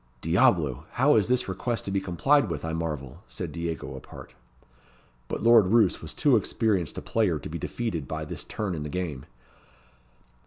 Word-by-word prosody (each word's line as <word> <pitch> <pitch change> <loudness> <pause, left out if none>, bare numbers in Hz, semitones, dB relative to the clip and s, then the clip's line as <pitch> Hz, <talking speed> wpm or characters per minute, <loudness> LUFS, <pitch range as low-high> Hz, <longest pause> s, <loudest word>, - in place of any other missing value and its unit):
"Diablo! 80 -5 +2
how 140 +4 +4
is 105 -3 +3
this 125 +1 +1
request 105 +4 -2
to 100 - -3
be 95 0 0
complied 115 - +2
with, 80 -2 -4
I 80 - -3
marvel?" 75 -6 -4
said - - -6
Diego 85 0 -4
apart. - - -11 0.9
But - - -4
Lord 115 -4 +7
Roos 110 -2 +3
was - - -6
too - - +3
experienced 100 -8 0
a - - -5
player 105 -8 +1
to 75 - -8
be 85 +2 -5
defeated 85 - -3
by 80 +1 -4
this - - -6
turn 105 -4 -3
in 80 - -4
the 75 - -4
game. 80 -5 -4
90 Hz, 180 wpm, -27 LUFS, 80-110 Hz, 0.9 s, Lord